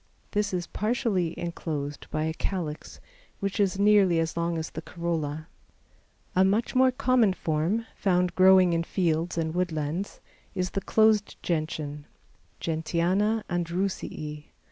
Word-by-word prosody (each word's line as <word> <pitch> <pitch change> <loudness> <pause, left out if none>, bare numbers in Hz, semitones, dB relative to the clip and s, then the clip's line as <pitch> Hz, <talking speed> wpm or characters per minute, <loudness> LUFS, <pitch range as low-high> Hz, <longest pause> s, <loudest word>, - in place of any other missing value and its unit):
This 205 -1 0
is 180 -2 -2
partially 210 -6 -1
enclosed 150 -4 -4
by 155 - -1
a 160 0 -1
calyx, 165 -3 -4 0.4
which 200 +1 -2
is 195 -2 +2
nearly 200 -4 +5
as 165 -1 0
long 170 0 -1
as 160 0 -4
the 160 - -6
corolla. 160 -3 -3 0.9
A 185 - +5
much 205 +5 +1
more 260 0 +5
common 250 -5 +3
form, 170 +7 -1
found 180 -2 +1
growing 185 -1 +6
in 165 - +1
fields 170 -1 -1
and 160 -1 -1
woodlands, 170 +1 -2 0.4
is 185 -1 -1
the 195 - -2
closed 215 -1 +3
Gentian 155 -3 -3 0.5
(Gentiana 175 +7 0
Andrewsii). 170 -4 -3
175 Hz, 130 wpm, -27 LUFS, 160-200 Hz, 0.9 s, growing